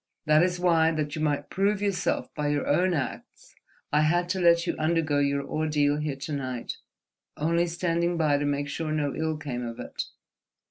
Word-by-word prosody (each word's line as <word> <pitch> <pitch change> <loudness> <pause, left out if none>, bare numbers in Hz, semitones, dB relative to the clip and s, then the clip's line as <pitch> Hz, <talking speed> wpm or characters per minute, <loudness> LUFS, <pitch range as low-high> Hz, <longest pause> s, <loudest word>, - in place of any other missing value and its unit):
That 155 0 +5
is 180 0 +1
why, 165 -3 +4
that 150 -2 -2
you 155 - -4
might 150 -2 -1
prove 200 +1 +1
yourself 200 -3 -1
by 150 -1 -2
your 145 0 0
own 180 +4 +2
acts, 140 -4 -5 0.4
I 150 - +5
had 175 +3 +2
to 190 0 0
let 170 -1 +4
you - - -1
undergo 155 -2 +1
your 140 0 +1
ordeal 150 -1 +1
here 150 -2 -2
to 140 +3 -6
night, 130 -4 -4 0.6
only 170 +3 +1
standing 170 0 0
by 150 -3 +2
to 145 - -1
make 145 0 -1
sure 155 +2 -3
no 150 -2 0
ill 160 -1 -1
came 135 -5 -4
of 115 -1 -6
it. - - -5
155 Hz, 190 wpm, -27 LUFS, 145-170 Hz, 0.6 s, That